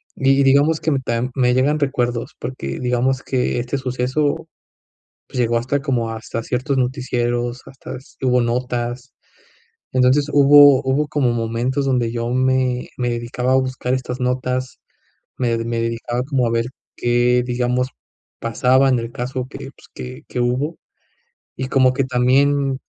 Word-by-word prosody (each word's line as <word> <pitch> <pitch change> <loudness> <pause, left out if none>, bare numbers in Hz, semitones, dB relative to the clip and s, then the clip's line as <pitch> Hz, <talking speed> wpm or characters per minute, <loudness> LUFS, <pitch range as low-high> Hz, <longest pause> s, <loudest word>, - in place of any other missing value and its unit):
Y 135 +1 +3
digamos 140 +4 +4
que 160 - 0
mm, 135 -2 0
tam 120 +1 -1
me 125 -2 +3
llegan 145 +4 +2
recuerdos 125 -4 -1
porque 70 - -5
digamos 125 +1 0
que 125 -2 -1
este 125 +3 -2
suceso 130 +3 -1 0.8
pues, 125 - -5
llegó 120 -1 +2
hasta 130 +4 -1
como 120 -5 -1
hasta 115 +1 -5
ciertos 130 +3 -1
noticieros, 125 -1 -1
hasta 135 - -9
s 130 - -17
hubo 125 -1 +3
notas. 120 +1 -2 0.8
Entonces, 130 +3 +4
hubo 145 -1 +7
hubo 135 +3 +1
como 145 -4 +1
momentos 120 +4 -1
donde 125 -4 +1
yo 115 0 -3
me 130 -1 +1
me 125 -1 -1
dedicaba 120 +2 -1
a - - +5
buscar 130 -1 -1
estas 130 0 -3
notas. 125 0 -2 0.6
Me 120 -2 0
me 115 0 -2
dedicaba 115 +1 -2
como 130 -3 0
a - - -1
ver, 115 0 0 0.3
qué 120 +1 +2
digamos 125 +1 0 0.5
pasaba 125 +4 +3
en 125 -2 +2
el 115 0 -5
caso 125 +1 -4
que, - - -9
pues, - - -20
que 65 0 -8
que - - -4
hubo, 125 +6 0 0.8
y 130 - -3
como 130 -1 +3
que 135 +1 0
también 135 +2 +2
125 Hz, 155 wpm, -20 LUFS, 120-135 Hz, 0.8 s, hubo